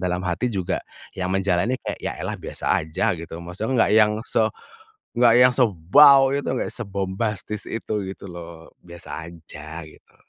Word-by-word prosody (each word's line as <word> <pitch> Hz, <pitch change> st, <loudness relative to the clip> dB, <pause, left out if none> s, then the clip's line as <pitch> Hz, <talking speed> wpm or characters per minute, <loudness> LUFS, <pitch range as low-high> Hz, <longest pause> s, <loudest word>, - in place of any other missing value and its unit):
dalam 90 Hz, -1 st, -1 dB
hati 90 Hz, +8 st, -1 dB
juga, 95 Hz, -4 st, -2 dB, 0.4 s
yang 90 Hz, -1 st, -2 dB
menjalani 95 Hz, +5 st, +1 dB
kayak -, -, -5 dB
ya -, -, -2 dB
elah -, -, -3 dB
biasa -, -, -8 dB, 0.2 s
aja 80 Hz, +7 st, 0 dB
gitu 80 Hz, 0 st, -8 dB
maksudnya 110 Hz, +8 st, 0 dB
nggak -, -, 0 dB
yang 105 Hz, -1 st, +5 dB
se 110 Hz, -2 st, +2 dB, 0.7 s
nggak 120 Hz, -2 st, +6 dB
yang 125 Hz, 0 st, +6 dB
sebaw 135 Hz, -, +5 dB
itu 140 Hz, -, -2 dB
nggak 130 Hz, -, -2 dB
sebombastis 100 Hz, 0 st, -3 dB
itu 110 Hz, -2 st, -3 dB
gitu 100 Hz, -, -10 dB
loh 85 Hz, -1 st, -10 dB
biasa 85 Hz, -1 st, -9 dB
aja 80 Hz, -1 st, -10 dB
gitu. -, -, -19 dB
95 Hz, 155 wpm, -23 LUFS, 85-115 Hz, 0.7 s, nggak